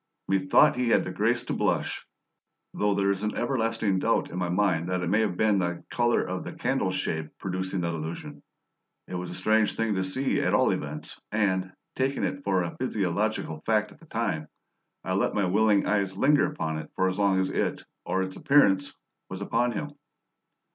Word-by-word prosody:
Methought 95 +4 +4
he 125 -1 +1
had - - +4
the - - -5
grace - - +1
to - - -3
blush, - - -1 0.7
though 105 -1 +1
there 100 0 +2
is 100 0 -2
an 105 0 -2
everlasting 115 -5 0
doubt - - +1
in 90 - -4
my 90 -1 -1
mind 90 -2 +1
that 90 -1 -1
it 85 - -1
may 105 - +4
have 105 -5 0
been 105 -2 +3
the 85 -1 -2
colour 120 -1 +2
of 90 0 -4
the - - -7
candle 130 -6 0
shade 80 -4 -2
producing 95 0 -3
that 85 0 -1
illusion. 80 +1 -6 0.7
It - - -9
was 90 0 -4
a 90 - -6
strange 110 -1 +2
thing 115 -1 0
to 95 -1 0
see, 130 +9 0
at - - +2
all - - +4
events, - - -5
and, 95 -3 +1 0.2
taking 135 +1 0
it 140 - -2
for 95 -2 +1
a 85 - -5
physiological 100 -7 -1
fact 105 -1 +1
at - - -17
the 165 - -18
time, 100 - -2 0.6
I - - -2
let - - +1
my 100 - +2
willing 105 +2 +3
eyes 100 -2 0
linger 145 +6 +4
upon 80 - -3
it 80 - -8
as 95 +1 +1
long 100 -2 +3
as 95 - 0
it - - -1 0.2
(or 95 - 0
its 95 0 -6
appearance) 95 -10 +3 0.4
was 95 - -6
upon 120 +4 +1
him. 145 +7 -4
100 Hz, 195 wpm, -27 LUFS, 90-110 Hz, 0.7 s, Methought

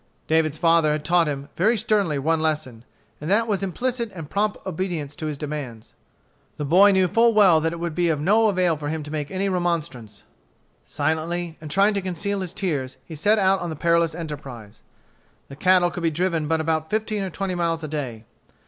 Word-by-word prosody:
David's 160 -1 +1
father 165 -2 +3
had 150 0 -4
taught 170 0 +3
him, 140 -1 -4
very 220 +7 +2
sternly, 200 -8 +1
one 160 +4 +1
lesson, 150 -7 -2 0.4
and 150 - -4
that 225 +4 +3
was 200 -3 0
implicit 235 +4 -2
and 160 -5 -9
prompt 205 +1 0
obedience 170 -6 -3
to 160 -3 -5
his 150 -2 -4
demands. 140 -7 -6 0.6
The 150 - -3
boy 185 +8 +6
knew 190 -1 +3
full 230 +5 +3
well 185 -7 +6
that 165 +1 0
it 170 - -6
would 170 -1 -3
be 175 +1 +1
of 155 -3 0
no 210 +8 +3
avail 180 -5 +2
for 145 -1 -5
him 160 0 -3
to 150 - -9
make 150 -2 -3
any 195 +1 -1
remonstrance. 165 - -3 0.6
Silently, 160 +3 -2
and 155 - -8
trying 195 +6 +3
to 200 - -1
conceal 190 +2 -3
his 180 -3 -3
tears, 145 -9 -3
he 165 - -10
set 205 +9 +2
out 195 -1 +3
on 175 - -4
the 160 - -4
perilous 170 +1 +1
enterprise. 135 -10 -8 0.7
The 140 - -9
cattle 180 +3 +3
could 175 - -6
be 165 - +2
driven 165 -1 -1
but 160 +1 +1
about 160 0 -1
fifteen 215 -1 -1
or 190 - -3
twenty 190 +2 -3
miles 165 -2 -1
a - - -3
day. 130 -7 -5
165 Hz, 205 wpm, -23 LUFS, 150-190 Hz, 0.7 s, boy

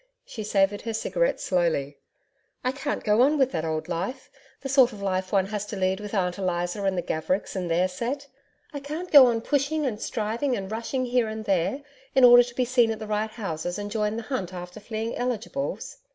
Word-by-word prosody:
She 220 - -7
savoured 205 -1 +1
her 225 -1 -4
cigarette - - 0
slowly. 160 -6 0 0.6
'I 255 - +1
can't 285 +2 -3
go 210 +2 +3
on 290 +4 +4
with 265 -2 +3
that 160 - -2
old 160 0 -2
life, 180 +9 -4 0.3
the 270 - -4
sort 265 -2 +5
of 210 - -10
life 185 -1 -2
one 195 -2 +3
has 205 0 -3
to 210 - -5
lead 190 0 0
with 210 +1 -6
Aunt 180 -1 0
Eliza 175 +1 -1
and 190 -1 +1
the 175 - -1
Gavericks 180 +7 -2
and 180 -2 -2
their 175 +3 +2
set. 240 +10 -4 0.5
I 285 - -4
can't 305 +6 -6
go 280 -4 +10
on 230 -2 +1
pushing 290 +3 0
and 225 -5 -3
striving 235 +4 -1
and 195 0 -6
rushing 235 +4 -2
here 245 -2 +1
and 220 0 -5
there 195 - 0 0.3
in 265 - +5
order 245 0 +10
to 240 0 -4
be 255 - +1
seen 245 -2 +3
at 220 - -2
the 215 - -7
right 215 +1 -1
houses 175 -6 -4
and 205 0 -5
join 210 0 0
the 230 - -4
hunt 195 -8 -4
after 180 +2 -8
fleeing 220 +2 -4
eligibles.' 250 +3 -3
215 Hz, 215 wpm, -26 LUFS, 185-250 Hz, 0.6 s, go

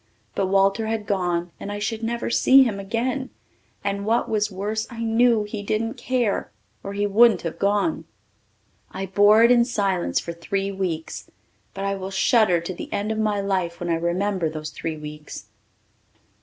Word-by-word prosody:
But 195 - 0
Walter 195 +3 +2
had 220 -1 -2
gone 175 -3 -1
and 205 - -6
I 205 - -4
should 220 +2 -3
never 235 +1 -2
see 270 +3 +6
him 215 -6 -2
again, 240 +6 -2 0.5
and 200 0 -2
what 230 +3 +1
was 210 -2 0
worse 210 +4 -3
I 230 -2 -6
knew 230 0 +3
he 210 0 -5
didn't 220 +3 -1
care 245 -5 -1 0.3
or 200 - -6
he 205 0 0
wouldn't 220 +3 +4
have 165 - -5
gone. 205 +11 +1 0.8
I 195 - -5
bore 205 +4 +5
it 235 - +6
in 240 -1 +6
silence 195 - 0
for 170 - -6
three 195 +4 -3
weeks, 180 -5 -4 0.5
but 195 0 -4
I 200 - 0
will 190 -1 -5
shudder 195 -2 +3
to 170 +2 -5
the - - -8
end 205 +2 -2
of 220 - -2
my 210 -2 +1
life 185 -4 -1
when 175 - -4
I 165 - +2
remember 175 +1 -1
those 155 -1 -6
three 160 -1 -5
weeks. 150 0 -9
200 Hz, 180 wpm, -23 LUFS, 185-225 Hz, 0.8 s, see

